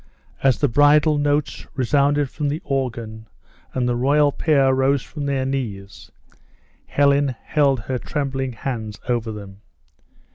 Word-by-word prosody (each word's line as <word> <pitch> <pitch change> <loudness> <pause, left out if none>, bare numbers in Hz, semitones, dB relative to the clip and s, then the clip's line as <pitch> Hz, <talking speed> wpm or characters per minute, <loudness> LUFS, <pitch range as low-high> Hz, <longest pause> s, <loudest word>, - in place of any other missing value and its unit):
As 135 -2 +3
the 145 - +2
bridal 145 +3 +4
notes 145 0 -1
resounded 140 +2 +2
from 145 +2 -3
the 150 +3 -2
organ, 120 -5 -3 0.4
and 125 -1 -1
the 120 - 0
royal 145 +4 +3
pair 140 -3 +2
rose 135 0 +2
from 145 -3 -6
their 135 -2 0
knees, 105 -8 -5 0.8
Helen 140 -2 +2
held 140 -5 +2
her 125 +5 -3
trembling 135 -3 -3
hands 110 -3 -5
over 120 -3 -1
them. 100 -2 -10
135 Hz, 135 wpm, -21 LUFS, 120-145 Hz, 0.8 s, bridal